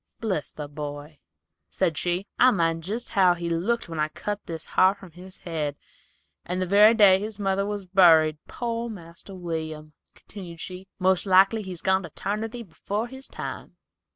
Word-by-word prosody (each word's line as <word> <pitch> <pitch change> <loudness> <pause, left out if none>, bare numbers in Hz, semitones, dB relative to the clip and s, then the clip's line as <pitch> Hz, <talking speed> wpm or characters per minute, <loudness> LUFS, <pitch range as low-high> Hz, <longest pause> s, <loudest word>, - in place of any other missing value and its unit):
"Bless 190 -10 -2
the 150 -1 -7
boy," 145 0 -7 0.5
said 175 -5 0
she, 175 +5 -1
"I 255 - +7
mind 165 -6 +1
jest 220 +7 -4
how 185 -3 +4
he 170 -1 -4
looked 210 +8 0
when 165 -2 -6
I 150 - +2
cut 205 +6 -5
this 165 -1 -5
har 190 +1 +3
from 190 -3 -14
his 185 +3 -12
head, 155 -4 -3 0.7
the 185 +1 -1
very 205 +4 +6
day 195 -4 +6
his 210 +1 -5
mother 195 -1 0
was 205 -2 -4
buried. 165 -5 +5
Poor 235 -1 -3
Marster 175 -1 -10
William," 160 -3 -5 0.2
continued 175 -5 -11
she, 185 +2 -7
"most 190 +1 +2
likely 195 +4 +5
he's 185 -4 -8
gone 190 0 +3
to 170 - -8
'tarnity 220 +8 -4
'fore 210 +4 -4
this 265 +1 -9
time." - - -7
185 Hz, 170 wpm, -25 LUFS, 165-205 Hz, 0.7 s, I